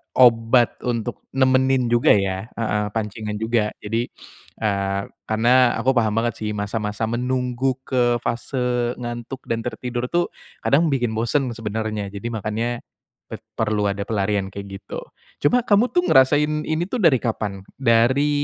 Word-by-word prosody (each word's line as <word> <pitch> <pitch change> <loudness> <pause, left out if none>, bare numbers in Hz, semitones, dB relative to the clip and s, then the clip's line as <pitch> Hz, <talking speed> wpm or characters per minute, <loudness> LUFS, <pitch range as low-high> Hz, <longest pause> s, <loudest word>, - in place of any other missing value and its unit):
obat 120 -1 +5
untuk 120 -1 -3
nemenin 130 -1 +3
juga 120 0 +5
ya 95 +1 -1
heeh, 105 -2 0
pancingan 105 -1 -3
juga. 110 -1 +1
Jadi, 115 +3 -1 0.5
eee, 100 -2 0 0.3
karena 120 +3 +4
aku 125 - +1
paham 110 -2 +2
banget 115 0 0
sih 105 -1 -2
masa 105 +2 -2
masa 105 +1 -3
menunggu 125 +1 -1
ke 120 -2 +2
fase 125 0 -1
ngantuk 120 +2 -6
dan 115 - 0
tertidur 125 0 -3
tuh 175 +4 0 0.3
kadang 160 +4 +3
bikin 125 -5 0
bosen 120 +4 0
sebenernya. 110 -2 -3
Jadi 100 +3 -6
makanya 115 +2 -2 0.5
bet - - -8 0.2
perlu 105 -1 +1
ada 100 0 -3
pelarian 100 -2 0
kayak 100 0 -7
gitu. - - -7 0.4
Cuma 245 +12 +4
kamu 220 +3 +4
tuh 355 0 +2
ngerasain 150 +3 +4
ini 160 +2 -1
tuh 245 +2 -2
dari 145 -7 +6
kapan? 105 -4 -3
Dari 130 +3 +3
120 Hz, 145 wpm, -22 LUFS, 110-130 Hz, 0.5 s, dari